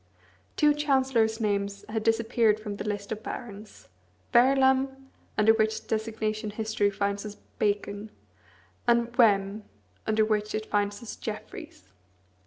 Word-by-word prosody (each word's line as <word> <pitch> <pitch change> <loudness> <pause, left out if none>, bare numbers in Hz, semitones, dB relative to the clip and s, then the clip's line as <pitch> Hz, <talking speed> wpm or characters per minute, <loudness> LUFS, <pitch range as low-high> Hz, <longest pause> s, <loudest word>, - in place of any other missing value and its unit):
Two 300 -1 +5
chancellors' 265 -6 +1
names 200 -2 -1
had 220 +1 -2
disappeared 225 -1 +2
from 210 -2 -6
the - - -4
list 205 -1 -4
of 215 0 -3
barons 205 - -8 0.5
Verulam, 265 +1 +3 0.3
under 215 +1 +6
which 220 0 0
designation 215 -1 -2
history 215 -1 0
finds 200 0 -2
us 210 -1 -7 0.2
Bacon; 205 0 -1 0.8
and 235 0 +2
Wem, 205 -3 +3 0.4
under 220 0 +3
which 215 -1 -1
it 215 0 -3
finds 205 +2 -1
us 230 - -7
Jeffreys. 95 +1 -8
215 Hz, 125 wpm, -27 LUFS, 205-230 Hz, 0.8 s, under